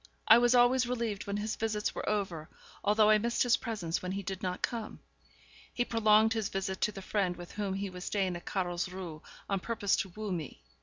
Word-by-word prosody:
I -, -, +9 dB
was 240 Hz, +1 st, +4 dB
always 245 Hz, +1 st, +5 dB
relieved 230 Hz, -5 st, -2 dB
when 200 Hz, 0 st, -1 dB
his 215 Hz, +1 st, -2 dB
visits 215 Hz, -1 st, -1 dB
were -, -, -3 dB
over, 190 Hz, -7 st, -2 dB, 0.3 s
although 210 Hz, +1 st, +5 dB
I 215 Hz, -, +6 dB
missed 235 Hz, +2 st, +1 dB
his 245 Hz, -2 st, +4 dB
presence 185 Hz, -8 st, -3 dB
when 185 Hz, 0 st, -3 dB
he 200 Hz, +1 st, -3 dB
did 190 Hz, +1 st, -5 dB
not 180 Hz, -2 st, -3 dB
come. 230 Hz, -3 st, -3 dB, 0.7 s
He 245 Hz, -, 0 dB
prolonged 220 Hz, -1 st, +4 dB
his 220 Hz, -3 st, -1 dB
visit 190 Hz, 0 st, -3 dB
to -, -, +2 dB
the 195 Hz, -2 st, -9 dB
friend 185 Hz, -3 st, 0 dB
with 175 Hz, -1 st, -9 dB
whom 200 Hz, -2 st, -2 dB
he 195 Hz, 0 st, -3 dB
was 180 Hz, 0 st, -8 dB
staying 190 Hz, -3 st, 0 dB
at 175 Hz, -, -8 dB
Carlsruhe, 180 Hz, -3 st, -3 dB, 0.3 s
on 195 Hz, -1 st, 0 dB
purpose 205 Hz, -1 st, 0 dB
to 195 Hz, -, -2 dB
woo 210 Hz, +2 st, -5 dB
me. 165 Hz, -5 st, -5 dB
200 Hz, 210 wpm, -31 LUFS, 185-220 Hz, 0.7 s, I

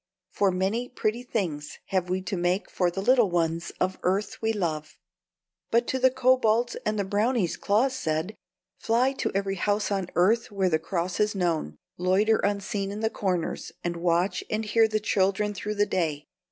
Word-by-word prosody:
for 200 Hz, -, +2 dB
many 195 Hz, +7 st, -1 dB
pretty 235 Hz, -1 st, -1 dB
things 175 Hz, -12 st, -3 dB
have 185 Hz, -2 st, 0 dB
we 185 Hz, +1 st, -1 dB
to 190 Hz, -, -3 dB
make 180 Hz, +2 st, 0 dB
for 180 Hz, -2 st, +1 dB
the 195 Hz, +3 st, -4 dB
little 240 Hz, -2 st, +4 dB
ones 170 Hz, -1 st, -1 dB
of 185 Hz, +1 st, -1 dB
earth 195 Hz, +3 st, -1 dB
we 225 Hz, 0 st, +1 dB
love!" 160 Hz, -7 st, -3 dB, 0.7 s
But 235 Hz, +1 st, +3 dB
to 260 Hz, -, 0 dB
the 260 Hz, 0 st, +5 dB
kobolds 250 Hz, -2 st, +2 dB
and 215 Hz, 0 st, 0 dB
the 200 Hz, -, +1 dB
brownies 205 Hz, 0 st, +1 dB
Claus 245 Hz, +6 st, +1 dB
said: 160 Hz, +3 st, -2 dB, 0.5 s
"Fly 245 Hz, +4 st, +2 dB
to 270 Hz, -, -2 dB
every 195 Hz, 0 st, -1 dB
house 205 Hz, +3 st, 0 dB
on 195 Hz, -3 st, -1 dB
earth 215 Hz, +7 st, +3 dB
where 195 Hz, -2 st, +1 dB
the 160 Hz, -2 st, +2 dB
cross 170 Hz, +1 st, -3 dB
is 210 Hz, 0 st, +2 dB
known; 165 Hz, -, -1 dB, 0.2 s
loiter 195 Hz, +5 st, +3 dB
unseen 200 Hz, 0 st, -1 dB
in 205 Hz, +2 st, -5 dB
the 220 Hz, 0 st, 0 dB
corners, 180 Hz, -4 st, -2 dB
and 175 Hz, 0 st, -2 dB
watch 175 Hz, +2 st, +1 dB
and 220 Hz, +1 st, -1 dB
hear 225 Hz, +1 st, +4 dB
the 215 Hz, 0 st, 0 dB
children 205 Hz, 0 st, +1 dB
through 210 Hz, +2 st, -4 dB
the 205 Hz, 0 st, +3 dB
day. 155 Hz, -7 st, -1 dB
200 Hz, 180 wpm, -26 LUFS, 180-220 Hz, 0.7 s, the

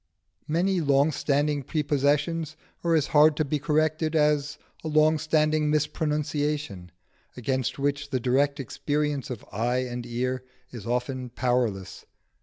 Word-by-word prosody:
Many 175 Hz, +4 st, +1 dB
long 140 Hz, 0 st, +3 dB
standing 145 Hz, 0 st, 0 dB
prepossessions 150 Hz, +2 st, 0 dB, 0.3 s
are 170 Hz, -1 st, +3 dB
as 155 Hz, -3 st, +3 dB
hard 150 Hz, 0 st, +5 dB
to 155 Hz, -, +1 dB
be 145 Hz, +1 st, -1 dB
corrected 155 Hz, +2 st, +1 dB
as 150 Hz, -1 st, +2 dB, 0.3 s
a -, -, -4 dB
long 155 Hz, 0 st, +3 dB
standing 155 Hz, -1 st, +2 dB
mispronunciation, 150 Hz, -, -1 dB, 0.5 s
against 130 Hz, 0 st, -1 dB
which 145 Hz, +1 st, -1 dB
the 130 Hz, -2 st, 0 dB
direct 140 Hz, +4 st, +1 dB
experience 145 Hz, +1 st, -2 dB
of 125 Hz, -5 st, -6 dB
eye 120 Hz, +4 st, 0 dB
and 120 Hz, -1 st, -5 dB
ear 125 Hz, +2 st, -2 dB, 0.3 s
is 115 Hz, -4 st, -8 dB
often 125 Hz, +1 st, -2 dB
powerless. 120 Hz, -6 st, -1 dB
145 Hz, 130 wpm, -26 LUFS, 130-155 Hz, 0.5 s, hard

